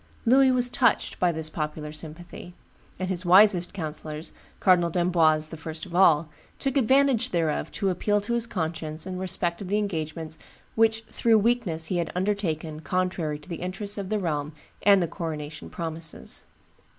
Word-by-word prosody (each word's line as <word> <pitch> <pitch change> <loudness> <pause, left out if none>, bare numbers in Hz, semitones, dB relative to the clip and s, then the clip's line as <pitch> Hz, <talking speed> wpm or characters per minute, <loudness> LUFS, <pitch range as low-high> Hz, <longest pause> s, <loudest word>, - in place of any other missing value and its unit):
Louis 265 +3 +6
was 250 -1 +3
touched 250 -1 +1
by 180 -1 +3
this 160 -1 -1
popular 150 -1 -4
sympathy; 170 +3 -10 0.4
and 185 - -3
his 185 -1 -3
wisest 185 0 +6
councillors, 155 -3 -5 0.3
Cardinal 180 -3 +4
d'Amboise 165 -3 +2
the 160 - -8
first 160 0 -6
of 180 - -12
all, 165 -4 +5 0.3
took 270 -1 -2
advantage 270 -1 +3
thereof 165 -3 -1
to 195 -3 0
appeal 205 +3 +1
to 225 +4 -3
his 235 0 -1
conscience 160 -5 -4
in 185 -1 -5
respect 180 -1 -1
of 195 - -5
the 205 +3 +1
engagements 160 -5 -3 0.3
which 225 0 +2
"through 225 0 +2
weakness 210 -8 +1
he 180 +2 -1
had 170 -1 -1
undertaken 175 -5 -2
contrary 170 -2 -1
to 150 - -17
the 170 -2 -5
interests 200 +3 -3
of 195 -2 -5
the 215 - +1
realm 150 -5 -2 0.3
and 200 -3 +5
the - - -1
coronation 155 -3 -6
promises." 165 -1 -4
175 Hz, 165 wpm, -26 LUFS, 160-205 Hz, 0.4 s, Louis